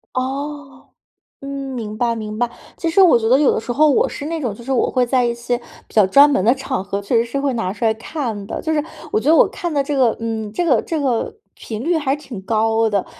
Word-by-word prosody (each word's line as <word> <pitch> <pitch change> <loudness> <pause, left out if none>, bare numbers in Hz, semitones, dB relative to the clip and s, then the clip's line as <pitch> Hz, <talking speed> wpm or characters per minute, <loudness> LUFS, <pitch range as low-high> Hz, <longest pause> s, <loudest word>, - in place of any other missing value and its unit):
哦， 275 +1 -5 0.5
嗯， 275 - -8 0.3
明 215 -3 -5
白 235 0 0
明 215 -1 -5
白。 240 +1 0 0.3
其 335 - -2
实 390 - +3
我 365 -8 +7
觉 225 -1 0
得 255 +3 +5
有 295 - +4
的 - - -1
时 235 - -8
候 305 +5 +4
我 280 - +3
是 290 - -6
那 325 +1 -3
种， 245 -7 -2
就 235 +4 -11
是 270 - -2
我 255 - +1
会 250 -1 +1
在 250 0 +2
一 235 - +1
些， 235 +1 -2 0.3
比 - - -21
较 215 - +6
专 275 +10 +6
门 275 -10 +1
的 235 - +5
场 265 -5 -3
合， 200 +1 -3
确 200 +4 -3
实 230 - +3
是 240 +4 -4
会 280 -1 0
拿 225 -6 -2
出 215 +3 -5
来 220 -1 +3
看 225 -3 -5
的， - - -5
就 320 - -2
是 300 - +1 0.3
我 - - +2
觉 280 - +1
得 325 - +6
我 - - +6
看 350 -4 -5
的 285 -2 +1
这 290 - -2
个， 250 -4 +3
嗯， 220 -2 -4
这 350 - -1
个 260 -10 +3
这 320 -2 -3
个 260 - -1 0.2
频 220 -1 -7
率 340 +2 +2
还 285 -3 0
挺 260 -9 -9
高 225 +2 +1
的。 200 -2 0
245 Hz, 285 characters per minute, -19 LUFS, 220-285 Hz, 0.5 s, 我